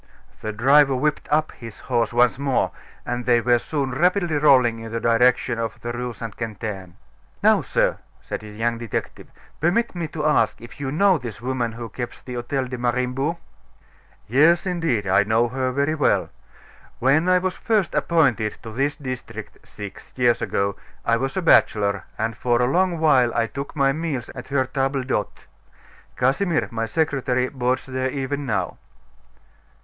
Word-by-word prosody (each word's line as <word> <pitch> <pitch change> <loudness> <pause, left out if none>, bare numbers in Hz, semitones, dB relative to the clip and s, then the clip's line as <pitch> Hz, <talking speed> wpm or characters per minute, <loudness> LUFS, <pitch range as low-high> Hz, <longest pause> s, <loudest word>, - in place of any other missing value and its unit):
The 110 - -3
driver 135 +5 +4
whipped 150 +3 -1
up 155 +1 +2
his 115 -3 -11
horse 120 -3 0
once 120 +2 +3
more, 140 -2 +1 0.3
and 120 0 -3
they 120 -1 +4
were 120 +1 +3
soon 140 0 -2
rapidly 175 +3 +1
rolling 125 -6 +4
in 115 0 -8
the 115 - -2
direction 115 +1 +2
of 115 -1 -3
the 120 - -4
Rue 125 0 -3
St. 115 -2 -7
Quentin. 105 -5 -6 0.5
"Now, - - +5
sir," - - 0 0.2
said - - -5
the 105 - -11
young 115 +2 -2
detective, 115 -2 -5 0.3
"permit 190 +10 +1
me 170 -3 -3
to 155 0 -4
ask 135 -7 +2
if 120 +4 -12
you 135 -2 -3
know 190 +3 +3
this 120 -2 -7
woman 120 -2 -2
who 115 0 -6
keeps 120 +3 -6
the 125 - -7
Hotel 125 +2 -2
de 125 -1 -6
Mariembourg?" 125 +6 -1 0.9
"Yes, 155 - +4
indeed, 165 - 0
I 95 +1 +4
know 110 +3 +2
her 130 +1 -1
very 140 +4 0
well. 150 - +1 0.7
When 145 +8 +3
I 185 - +5
was 185 0 -1
first 210 -6 0
appointed 125 -10 +1
to 115 - -7
this 140 +5 0
district, 125 -6 -7
six 100 -2 -10
years 120 -2 +2
ago, 100 0 -1 0.3
I 115 - +3
was 135 +7 -3
a 190 - 0
bachelor, 100 -10 +3
and 110 +1 -2
for 120 0 +1
a 125 - +3
long 175 +6 +1
while 135 -7 +4
I 115 - +2
took 140 +4 -7
my 135 -2 +3
meals 150 -6 -3
at 125 - -9
her 135 -1 +1
table 135 +1 -1
d'hote. 115 -6 -3 0.7
Casimir, 155 +7 +1
my 115 0 -2
secretary, 130 -4 0
boards 130 -1 -1
there 130 0 -2
even 140 +1 -3
now." 95 -6 -2
125 Hz, 170 wpm, -23 LUFS, 115-145 Hz, 0.9 s, Now